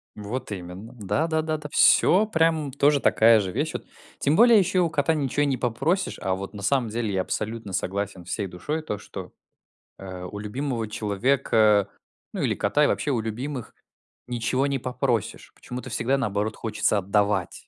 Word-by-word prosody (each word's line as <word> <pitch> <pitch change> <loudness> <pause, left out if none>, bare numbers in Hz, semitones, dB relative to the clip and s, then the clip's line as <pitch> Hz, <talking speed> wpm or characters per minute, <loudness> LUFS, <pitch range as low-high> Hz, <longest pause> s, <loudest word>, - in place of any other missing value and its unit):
Вот 105 +4 -5
именно! 95 +4 -7
Да 105 - 0
да 160 -1 +1
да 155 0 -2
да, 150 -1 -8
всё 200 +4 +5
прям 160 -7 +1
тоже 145 +1 +3
такая 115 -2 +5
же 95 -3 -3
вещь, - - -1
вот, - - -5 0.3
тем 145 +2 +2
более 230 +1 +7
еще 185 0 +1
и - - +5
у 170 - +2
кота 155 0 +1
ничего 145 -1 0
и - - +2
не 140 -2 +1
попросишь, 155 - -1
а 95 -1 0
вот 100 +2 -7
на 100 - -8
самом 125 +2 +1
деле, 110 -2 -2
я 95 - +1
абсолютно 110 +1 -4
согласен 95 0 -3
всей 95 +3 -3
душой 150 - -4
то 105 -9 -4
что, - - -9 0.7
а, 90 -1 -7
у 105 - -8
любимого 115 +2 -3
человека, 105 -1 +2 0.4
ну - - -3
или - - +1
кота, 145 +9 +1
и - - +5
вообще 150 - -1
у 120 - +1
любимых 125 +4 -5 0.5
ничего 125 +3 0
не 140 -1 0
попросишь, 125 -3 -2
почему-то 125 +1 -8
всегда 130 +3 0
наоборот 105 -3 -1
хочется 110 -2 0
отдавать. 100 -1 0
115 Hz, 185 wpm, -25 LUFS, 100-145 Hz, 0.7 s, более